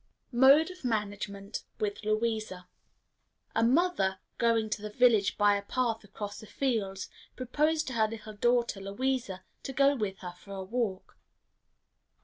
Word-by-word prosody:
Mode 275 +7 +6
of 365 -3 -13
Management 205 -3 -3 0.2
with 210 0 -2
Louisa. 215 -4 -1 0.9
A 225 - +3
mother, 245 - +2 0.2
going 230 -2 +3
to 210 - -2
the 210 - -5
village 220 -3 +3
by 205 -1 +5
a 200 - -1
path 225 +1 -1
across 205 0 -7
the 215 - -11
fields, 205 -8 -1 0.3
proposed 305 +5 +1
to 265 - -5
her 220 -2 +3
little 215 -1 -8
daughter 235 0 +1
Louisa 200 -1 -2 0.2
to 270 - -6
go 275 +1 +4
with 205 -6 -2
her 180 -1 -6
for 200 - -11
a 190 - -4
walk. 205 -2 -3
220 Hz, 145 wpm, -30 LUFS, 200-250 Hz, 0.9 s, Mode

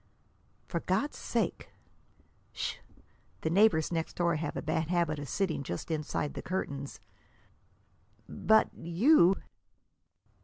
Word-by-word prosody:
"For 170 - -2
God's 190 - -1
sake!" - - -2 0.8
"Sh! - - -3 0.6
The 160 - -1
neighbors 180 -5 +4
next 165 -1 -2
door 170 -2 +2
have 150 -1 -3
a - - -2
bad 160 0 0
habit 170 -3 +1
of 145 -2 -6
sitting 185 -4 -1
just 110 - -5
inside 150 -1 -2
the - - -5
curtains." 140 -7 -4 1.3
"But 220 0 +3
you!" 185 - +4
165 Hz, 115 wpm, -31 LUFS, 155-185 Hz, 1.3 s, neighbors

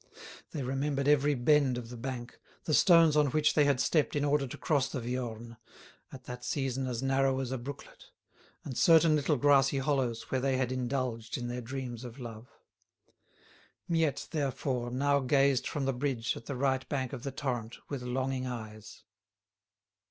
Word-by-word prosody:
They 145 - -4
remembered 135 +2 -1
every 145 0 +4
bend 135 0 +3
of 120 -2 -7
the 125 - -8
bank, 120 0 -6 0.2
the 155 - -1
stones 165 -2 +6
on 150 -1 +4
which 150 +2 +2
they 150 - +4
had 140 -3 +2
stepped 150 +2 +1
in 145 0 +1
order 145 -1 +1
to - - -8
cross 145 -6 +1
the 130 - -4
Viorne, 120 -1 -5 0.5
at 130 -1 -10
that 125 0 -8
season 135 -2 -2
as 125 0 -3
narrow 135 0 +2
as 130 -1 -3
a 130 - -1
brooklet, 140 +3 -9 0.6
and 130 - -6
certain 165 +2 +5
little 150 +1 +1
grassy 140 +1 +4
hollows 135 -5 -1
where 130 - 0
they 135 -1 +1
had 130 -1 0
indulged 125 -3 -2
in 120 -1 -4
their 125 +1 -4
dreams 125 -1 -6
of 120 0 -9
love. 115 -2 -8 1.4
Miette, 165 -4 0
therefore, 135 -4 -2
now 140 +3 +2
gazed 135 -1 +2
from 140 -2 -2
the 135 - +1
bridge 125 -3 -1
at 115 - -10
the 140 - -3
right 130 0 0
bank 130 -3 -2
of 130 - -5
the 140 - -4
torrent 120 -4 -4
with 140 -3 -5
longing 130 +1 -2
eyes. 110 -3 -8
130 Hz, 175 wpm, -30 LUFS, 125-140 Hz, 1.4 s, stones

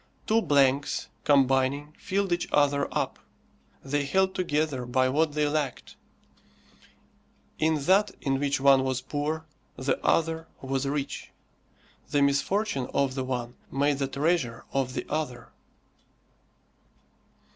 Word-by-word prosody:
Two 225 +1 +3
blanks, 140 -3 +2 0.2
combining, 140 +1 +2
filled 200 -1 -1
each 175 - -1
other 140 -1 +3
up. - - -2 0.7
They 145 +1 0
held 190 +7 +1
together 150 -7 -1
by 130 +1 +2
what 150 +2 +1
they 150 0 +1
lacked: 145 -3 -3 1.6
in 160 0 +3
that 200 +4 +4
in 135 -2 0
which 140 -1 0
one 135 -1 +5
was 130 -1 -1
poor, 150 +4 -3 0.3
the 130 +1 -2
other 165 0 +1
was 135 0 -2
rich. 140 0 -3 0.8
The 145 -1 +2
misfortune 140 - +1
of 140 -2 +2
the 130 -1 -2
one 125 -2 -3 0.2
made 140 0 +1
the 135 - 0
treasure 135 -3 -1
of 130 -2 -1
the - - -3
other. 145 -6 -3
140 Hz, 125 wpm, -27 LUFS, 135-155 Hz, 1.6 s, one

